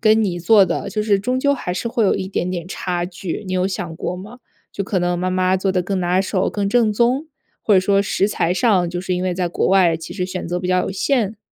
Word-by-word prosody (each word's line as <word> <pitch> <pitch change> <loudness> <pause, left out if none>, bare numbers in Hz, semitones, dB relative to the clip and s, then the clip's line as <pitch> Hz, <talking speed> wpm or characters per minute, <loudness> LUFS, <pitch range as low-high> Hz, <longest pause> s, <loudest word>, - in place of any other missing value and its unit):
跟 220 0 +4
你 175 -3 -2
做 195 +4 +5
的， 175 -2 -3
就 215 - -2
是 210 -2 +2
终 250 +6 -1
究 280 +2 +2
还 180 -9 -4
是 235 - -3
会 230 -1 +1
有 195 - +3
一 190 -1 -3
点 180 -2 -2
点 175 -2 -4
差 180 -1 -3
距， 185 +2 -5
你 185 - -4
有 185 0 +1
想 180 -4 -4
过 180 - -3
吗？ 210 +7 -10 0.3
就 200 - -3
可 190 -2 -1
能 175 0 0
妈 185 +1 -1
妈 185 0 +2
做 190 +1 0
得 180 - +1
更 190 +2 -2
拿 180 +1 +2
手、 190 -1 0
更 200 -1 -2
正 225 0 +3
宗？ 245 +7 +1 0.4
或 210 - +3
者 185 - +6
说 195 +1 +2
食 200 -1 +1
材 180 -4 0
上， 190 -5 +2
就 175 +1 -4
是 185 0 -3
因 180 - -2
为 185 -1 -1
在 180 -1 -1
国 170 - -1
外 185 -3 +4
其 165 - -9
实 180 -3 -2
选 185 -2 -5
择 175 - -1
比 180 - -4
较 185 0 +2
有 - - -2
限？ 215 +1 0
185 Hz, 290 characters per minute, -20 LUFS, 180-210 Hz, 0.4 s, 者